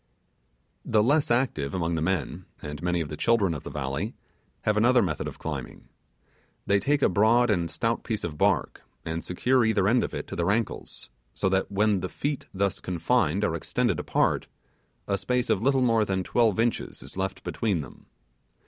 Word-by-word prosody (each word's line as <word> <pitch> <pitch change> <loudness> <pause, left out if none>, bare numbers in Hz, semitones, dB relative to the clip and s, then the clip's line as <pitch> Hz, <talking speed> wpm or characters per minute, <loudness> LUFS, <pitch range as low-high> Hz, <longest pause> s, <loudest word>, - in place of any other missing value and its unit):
The 110 -2 +2
less 145 +5 +2
active 120 - 0
among 85 -2 -1
the 80 - -1
men, 90 0 -2
and 75 0 -7
many 90 -1 0
of 75 - -4
the 75 - -5
children 100 0 +2
of 75 - -5
the - - -8
valley 75 - -3 0.5
have 110 - +2
another 120 +4 +4
method - - -2
of - - -7
climbing. 70 -6 -6 0.8
They 100 0 +3
take 140 +7 +1
a - - +6
broad 110 +5 +4
and 85 -4 0
stout 115 +6 -1
piece 110 -2 -3
of 80 -3 -4
bark, - - +1 0.2
and 80 +1 -3
secure 125 +8 +2
each 110 -1 +1
end 105 +6 +3
of - - -4
it - - -4
to - - -7
their 85 +2 0
ankles, 105 - -2 0.2
so 95 - +1
that 95 +1 0
when 105 0 +2
the 90 0 -4
feet 145 -1 -3
thus 100 0 -1
confined 90 +1 0
are 90 - +1
extended 80 - 0
apart, - - +1 0.6
a 100 -1 0
space 125 0 0
of 95 - +1
little 135 +2 +3
more 115 -3 +3
than 95 -2 -1
twelve 110 0 +2
inches 115 0 -1
is - - -11
left 95 0 -3
between 100 -8 -1
them. 65 - -13
100 Hz, 190 wpm, -27 LUFS, 85-115 Hz, 0.8 s, a